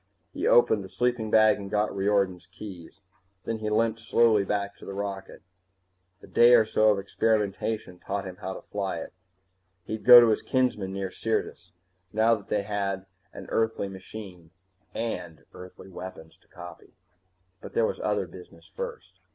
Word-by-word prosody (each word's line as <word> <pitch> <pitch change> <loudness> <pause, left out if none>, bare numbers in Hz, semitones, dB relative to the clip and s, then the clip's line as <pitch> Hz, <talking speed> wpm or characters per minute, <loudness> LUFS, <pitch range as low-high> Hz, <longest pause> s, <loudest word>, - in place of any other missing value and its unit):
He - - -2
opened 110 -4 +4
the 95 - -10
sleeping 120 0 -1
bag 110 -1 +5
and 100 -1 -8
got 105 0 0
Riordan's 95 -3 0
keys. 95 -3 -11 0.4
Then 115 -1 -3
he 105 -1 -2
limped 115 +1 +1
slowly 115 -2 +3
back 100 0 -2
to - - -13
the 100 - -6
rocket. 100 -1 -6 0.8
A - - -9
day 120 +1 +6
or 115 -2 +5
two 110 - -1
of 105 -2 +5
experimentation 105 -1 -1
taught 100 +1 -4
him 90 -1 -8
how 95 +1 -6
to - - -10
fly 100 -3 -3
it. 80 - -8 0.7
He'd 110 +3 -6
go 125 -1 +11
to 120 -1 +5
his 110 - +1
kinsmen 125 -7 0
near 95 -1 -4
Syrtis. 115 +3 -3 0.4
Now 110 +2 +3
that 105 -3 -4
they 105 -1 0
had 100 -2 -3 0.3
an - - -10
Earthly 110 -3 0
machine, 95 -3 -10 0.5
and 90 -8 -5
Earthly 90 +1 -12
weapons 90 -3 -10
to - - -32
copy 90 0 -12 0.7
But - - -10
there 475 +1 +3
was 485 - -3
other - - 0
business - - -14
first. 480 -1 -7
105 Hz, 165 wpm, -27 LUFS, 95-110 Hz, 0.8 s, go